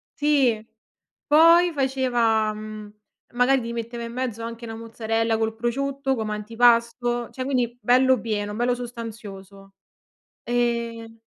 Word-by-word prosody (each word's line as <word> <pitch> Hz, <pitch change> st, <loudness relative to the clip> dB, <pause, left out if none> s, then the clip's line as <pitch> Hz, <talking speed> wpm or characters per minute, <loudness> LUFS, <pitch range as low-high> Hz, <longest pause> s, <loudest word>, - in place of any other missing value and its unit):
Sì, 270 Hz, -7 st, +2 dB, 0.6 s
poi 335 Hz, +3 st, +6 dB
faceva, 245 Hz, -6 st, +1 dB
mhmm, 215 Hz, -1 st, -9 dB, 0.4 s
magari 255 Hz, +2 st, +3 dB
ti 230 Hz, 0 st, -5 dB
metteva 235 Hz, 0 st, -5 dB
in 230 Hz, -, -7 dB
mezzo 235 Hz, -3 st, -4 dB
anche 230 Hz, +1 st, -7 dB
'na 225 Hz, -, -6 dB
mozzarella 225 Hz, 0 st, -1 dB
col 220 Hz, 0 st, -1 dB
prosciutto 270 Hz, +4 st, -1 dB
come 220 Hz, -3 st, -3 dB
antipasto, 235 Hz, +2 st, +1 dB
cioè 260 Hz, -, -5 dB
quindi 250 Hz, -3 st, -1 dB
bello 255 Hz, -1 st, +4 dB
pieno, 205 Hz, -2 st, -3 dB
bello 245 Hz, +2 st, +1 dB
sostanzioso. 210 Hz, -5 st, -9 dB, 0.7 s
E 235 Hz, -1 st, -2 dB
235 Hz, 120 wpm, -24 LUFS, 225-250 Hz, 0.7 s, poi